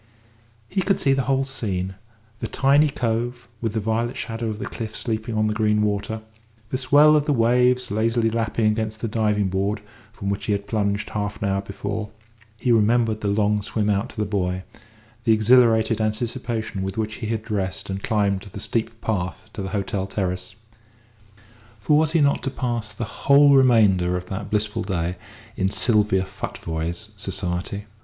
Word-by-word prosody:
He 190 - -1
could 195 +1 +1
see 135 -7 +3
the 135 - +1
whole 135 0 +2
scene: 95 -9 -3 0.5
the - - -3
tiny 140 +3 +4
cove, 120 -1 -2
with 115 -2 -1
the 110 - 0
violet 115 +3 -1
shadow 115 0 -4
of 105 - -4
the - - -5
cliff 110 -2 -6
sleeping 110 -1 -3
on 110 0 +2
the 105 - +1
green 105 -1 +2
water; 105 +1 -2 0.5
the 130 - -1
swell 145 +4 +6
of 150 -1 +2
the 150 - +1
waves 125 +1 +3
lazily 115 +2 +1
lapping 115 0 0
against 110 0 0
the 115 - -1
diving 105 -3 +1
board 100 +3 -1 0.3
from 100 -3 -5
which 100 - -3
he 105 - +1
had 100 0 -2
plunged 100 -1 -1
half 105 -1 -3
an 100 -3 -1
hour 100 0 0
before; 100 +2 -4 0.5
he 125 - 0
remembered 115 0 +3
the 105 - -1
long 105 +1 +2
swim 105 +1 0
out 100 +5 0
to - - -14
the 105 - 0
buoy; 95 -3 -1 0.6
the 115 -2 +4
exhilarated 110 0 +4
anticipation 110 -1 -2
with 95 +1 -4
which 110 0 -2
he 110 - -2
had 110 -1 -2
dressed 95 -4 -3
and 95 0 -4
climbed 100 -3 +1
the 100 0 -9
steep 115 +1 -2
path 105 +1 -3
to 105 - -5
the 95 - -4
hotel 100 -1 -2
terrace. 90 -2 -3 1.2
For 125 +9 +2
was 155 +1 +3
he 165 - +4
not 140 0 +3
to - - -2
pass 120 -5 -2
the 115 - -4 0.2
whole 140 0 +8
remainder 105 -9 +4
of 90 - -6
that 100 +1 -5
blissful 105 0 -1
day 90 -2 -2 0.4
in 95 0 +1
Sylvia 105 -3 +2
Futvoye's 85 +2 -5
society? 95 +1 -3
110 Hz, 180 wpm, -23 LUFS, 100-120 Hz, 1.2 s, whole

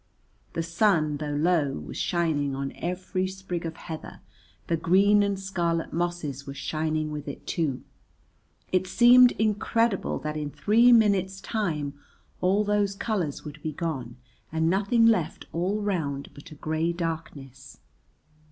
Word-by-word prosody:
The 165 - -1
sun, 165 -4 +2
though 145 0 -3
low, 155 -2 +2
was 75 - -7
shining 150 -5 0
on 135 0 -3
every 185 +1 -2
sprig 185 -3 -5
of 165 0 -7
heather, 160 -2 -8 0.4
the 170 - 0
green 200 +5 +4
and 200 -1 0
scarlet 170 -4 -2
mosses 165 -5 -3
were 140 - -6
shining 155 +1 -2
with 150 -1 -6
it 140 - -7
too, 150 -6 -2 0.9
it 185 0 +1
seemed 245 +3 +7
incredible 220 0 0
that 150 0 -4
in 150 -1 -3
three 230 +10 +4
minutes' 200 -4 +3
time 170 -9 -2 0.5
all 195 +3 +3
those 205 -1 +1
colours 190 -10 -2
would 150 0 -9
be 155 0 -4
gone 135 -8 -4 0.3
and 160 +1 +1
nothing 205 +4 +3
left 215 -9 +2
all 190 +5 -1
round 150 -9 -2
but 145 - -13
a 155 - -11
grey 160 +3 -1
darkness. 150 -6 -6
170 Hz, 145 wpm, -26 LUFS, 150-195 Hz, 0.9 s, seemed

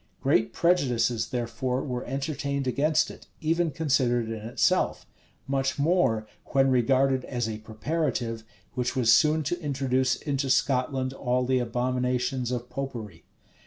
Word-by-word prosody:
[] - - -41
Great 130 -5 +2
prejudices, 125 -9 +1
therefore, 125 +1 -2
were 125 -3 -3
entertained 140 +1 -2
against 145 +4 +2
it, - - -14
even 165 +2 +1
considered 130 -7 +1
in 110 -1 -5
itself; 120 - +1 0.4
much 135 -1 -1
more 140 -8 +2 0.3
when 135 -1 +4
regarded 130 +1 +3
as 120 -3 -2
a 110 -1 -4
preparative, 115 0 -2 0.3
which 125 +2 -2
was 120 -3 +5
soon 155 0 +4
to 175 +5 -2
introduce 130 -3 +1
into 140 -2 -2
Scotland 130 0 +1
all 125 -1 0
the 130 0 +2
abominations 125 +1 -1
of 125 -1 -3
Popery. 115 -12 -6
130 Hz, 135 wpm, -27 LUFS, 120-140 Hz, 0.4 s, was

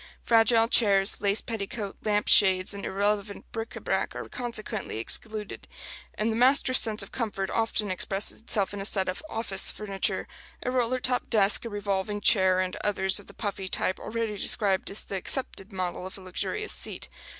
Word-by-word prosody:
Fragile 225 0 +4
chairs, 205 -6 +3
lace 200 +1 +2
petticoat 205 -2 -5
lamp 210 -1 0
shades 190 -1 +5
and 200 - -7
irrelevant 200 +1 -1
bric 225 0 -6
à - - -9
brac - - -1
are - - -6
consequently 230 - -4
excluded; 210 - -1 0.5
and 220 +2 -1
the - - -2
master's 255 +1 +4
sense 220 -2 +5
of - - -12
comfort 205 -5 -3
often 220 -3 -1
expresses 195 +3 0
itself 205 -4 0
in 200 - -5
a - - -5
set 195 -2 +2
of 185 - -3
"office" 220 -6 +1
furniture 200 -2 -3 0.4
a 250 - -2
roller 255 0 0
top 250 0 0
desk, 210 0 +2
a - - -4
revolving 205 0 -2
chair, 190 -3 +4
and 185 0 -2
others 190 -2 +1
of - - -13
the 200 - -13
puffy 200 -3 -4
type 185 - 0
already 220 -2 -4
described 195 -2 +2
as 200 - -1
the 200 - -6
accepted 200 -1 -2
model 185 -1 -4
of 190 - -10
a - - -12
luxurious 190 - -3
seat. - - -1
205 Hz, 180 wpm, -27 LUFS, 195-225 Hz, 0.5 s, shades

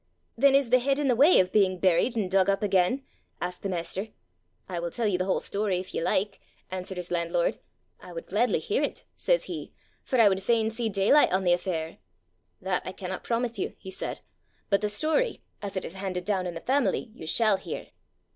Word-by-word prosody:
'Then 275 +3 +5
is 275 -4 +2
the 255 - +6
head 275 +2 +1
in 290 -1 0
the 250 - +3
way 290 +9 +6
of 185 0 +2
being 190 -3 +3
buried 185 +7 +2
and 200 -5 -1
dug 190 0 +4
up 195 +1 +1
again?' 195 +6 +2 0.4
asked 180 0 -4
the 200 - -3
master. 185 +3 -2 0.6
'I 175 -2 -3
will 170 0 -3
tell 230 +7 -2
you 195 -4 +1
the 185 - 0
whole 190 - +1
story, 200 -2 -1
if 185 +1 -6
you - - -1
like,' 195 +4 0 0.3
answered 185 0 -5
his 180 0 -5
landlord. 170 0 0 0.4
'I - - -11
would - - -6
gladly - - +1
hear 460 0 -1
it,' - - -2
says - - +1
he, - - -6 0.3
'for 255 - 0
I 225 - +8
would 190 -1 +2
fain 225 +2 +2
see 225 0 -1
daylight 210 +9 +4
on 190 +1 +1
the 175 -1 +4
affair!' 170 -3 -3 0.6
'That 185 -1 0
I 185 - -6
cannot 185 0 -5
promise 235 0 -1
you,' - - -3
he 190 - -9
said; - - -5 0.5
'but 200 - +4
the 210 - 0
story, 315 - 0 0.2
as 200 -2 -4
it - - -2
is - - -7
handed 190 -2 -4
down 190 -3 0
in 175 - -5
the 165 - -6
family, 260 -3 0
you 160 - -10
shall 215 +3 +3
hear. - - -7
195 Hz, 220 wpm, -27 LUFS, 185-235 Hz, 0.6 s, I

